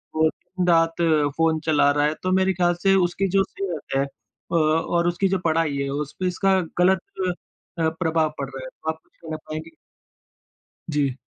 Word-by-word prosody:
वो 160 0 +4
दिन-रात 170 -1 0 0.4
फ़ोन 160 -1 +2
चला 150 -3 +4
रहा 145 0 +2
है 150 - +1
तो 185 - 0
मेरे 190 0 +3
ख़्याल 175 -1 +2
से 195 -1 +5
उसकी 195 +3 -1
जो 195 +1 +3
सेहत 185 -7 -5
है 135 - +3
अ, 115 +1 -10
और 165 +2 +2
उसकी 175 +3 +1
जो 190 0 0
पढ़ाई 160 -3 +1
है 140 0 -1
उस 145 +1 -3
पे 185 - 0
इसका 190 +1 +2 0.2
गलत 185 +1 +4 0.8
अ, 160 -1 +3
प्रभाव 160 -2 0
पड़ 135 -1 -3
रहा 135 -1 -8
है, 130 - -7
तो 160 - -7
आप 160 0 -3
कुछ - - -36
कहना 160 -2 -5
चाहेंगी? 155 +1 -7 1.2
जी। 145 -4 0
165 Hz, 185 wpm, -23 LUFS, 150-180 Hz, 1.2 s, से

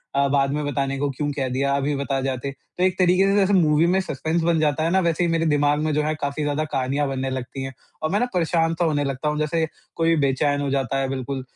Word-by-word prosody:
अ, 140 0 +3
बाद 140 0 +2
में 150 0 -1
बताने 135 -1 -1
को 145 0 0
क्यों 145 +2 -3
कह 140 -2 -2
दिया 135 +2 0
अभी 140 +1 -1
बता 140 0 -1
जाते। 135 0 -3
तो 140 +6 -7
एक 185 0 +2
तरीक़े 185 +1 +4
से 195 - +2
जैसे 200 0 +3
मूवी 160 -3 +4
में 185 +2 +3
सस्पेंस 160 0 -2
बन 165 -1 +2
जाता 155 0 +1
है 165 - +1
ना 190 - +4
वैसे 170 0 +1
ही 170 - +1
मेरे 165 0 +1
दिमाग 145 -1 +2
में 155 - 0
जो 150 - +2
हैं 155 +1 -1
काफ़ी 140 +2 -2
ज़्यादा 145 +1 0
कहानियाँ 135 +2 0
बनने 135 -1 -2
लगती 130 +1 -5
है। 135 - -5 0.3
और 155 - +1
मैं 205 - +2
ना 245 - +2
परेशान 165 -2 +1
तो 175 - +3
होने 150 -3 +1
लगता 140 +2 -2
हूँ 150 - -2
जैसे 160 +2 0 0.3
कोई 165 0 +2
बेचैन 145 +2 +1
हो 140 - -1
जाता 135 -1 -1
है 135 - 0
बिल्कुल 135 0 -3
145 Hz, 265 wpm, -23 LUFS, 135-165 Hz, 0.3 s, तरीक़े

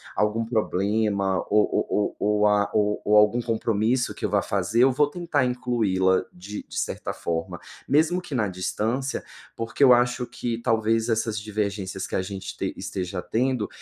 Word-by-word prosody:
algum 105 +3 +1
problema 100 -3 0
ou 105 0 +4 0.2
ou 105 - 0
ou 105 0 +2
a 105 -1 +2
ou 105 -1 +1
ou 105 0 +5
algum 105 +3 +4
compromisso 115 +1 0
que - - -12
eu - - 0
vá - - +2
fazer, 115 +3 +1
eu 135 - +3
vou 145 +3 +3
tentar 170 -5 0
incluí-la 110 -7 +1
de 100 +4 -8
de - - -4
certa - - -3
forma, 80 -1 -3 0.3
mesmo 160 +5 +2
que 175 - -9
na 110 -3 +1
distância, 110 +8 -2 0.3
porque 115 +5 -1
eu 130 - +8
acho 125 +1 +2
que 120 -1 -4
talvez 115 0 +1
essas 110 -1 0
divergências 100 -3 -3
que - - -4
a - - +1
gente 95 0 -6
t - - -2
esteja 90 -1 -4
tendo, 125 0 0
110 Hz, 170 wpm, -25 LUFS, 100-120 Hz, 0.3 s, eu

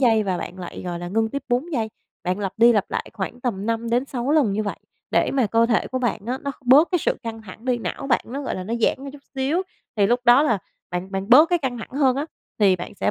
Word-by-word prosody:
giây 225 -4 +4
và 190 -3 -1
bạn 185 - -7
lại, 180 -1 -7
gọi 175 -1 -3
là, 175 - -5
ngưng 220 +4 +1
tiếp 280 +4 -4
4 260 +8 0
giây. 225 -5 -1 0.3
Bạn 180 +2 -1
lặp 195 -2 -2
đi 235 +1 +6
lặp 205 -3 0
lại - - -3
khoảng 210 +5 -5
tầm 215 -5 -2
5-6 240 +3 -1
lần 290 -10 +3
như 215 +2 0
vậy, 205 - -3 0.3
để - - +2
mà 260 -4 +2
cơ 230 +3 +3
thể 230 -2 +1
của 255 - -2
bạn 230 -4 -2
á, 255 +2 -2
nó 280 - -2
bớt 275 +7 +6
cái 355 - +3
sự - - +1
căng 225 -1 -6
thẳng 215 +3 -12
đi, 250 -2 +1
não 275 - -4
bạn - - +3
nó, 275 +4 -5
gọi - - -3
là, 185 - -5
nó 225 +5 -2
giãn 235 +4 0
ra 275 - -6
chút 285 -1 -13
xíu, 275 +7 0 0.3
thì 200 -2 +4
lúc 240 +3 +2
đó 245 +4 +7
là 230 -9 +2 0.3
bạn 180 +2 -4
bạn 195 +2 -3
bớt 295 +7 +8
cái 350 - +3
căng 255 -6 -3
thẳng - - -8
hơn 265 -1 +2
á, 290 - -2 0.3
thì 195 -4 +5
bạn 175 - -8
sẽ 100 - 0
235 Hz, 275 wpm, -23 LUFS, 205-265 Hz, 0.3 s, bớt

